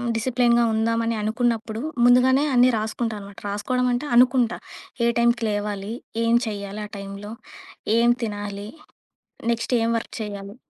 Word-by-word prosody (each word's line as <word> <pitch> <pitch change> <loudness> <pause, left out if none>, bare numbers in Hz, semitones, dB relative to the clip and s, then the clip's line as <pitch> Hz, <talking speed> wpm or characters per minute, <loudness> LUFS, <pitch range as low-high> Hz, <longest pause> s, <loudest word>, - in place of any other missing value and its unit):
డిసిప్లేన్‍గా 240 0 +2
ఉందామని 230 +1 0
అనుకున్నప్పుడు 225 0 -1 0.2
ముందుగానే 260 +3 +5
అన్నీ 250 +1 +6
రాసుకుంటా 220 +1 -2
అనమాట 200 0 -11
రాసుకోవడమంటే 250 +6 -1
అనుకుంటా. 245 -1 +4 0.5
ఏ - - +4
టైంకి 235 0 +2
లేవాలి? 205 0 -3 0.3
ఏం 230 0 +2
చేయాలి 200 0 -5
ఆ - - -29
టైంలో? 200 +1 -8 0.7
ఏం 235 +1 +4
తినాలి? 205 -1 -5 0.9
నెక్స్ట్ 230 +2 -2
ఏం 230 - +1
వర్క్ - - -9
చేయాలి? 200 0 -7
225 Hz, 125 wpm, -23 LUFS, 205-240 Hz, 0.9 s, అన్నీ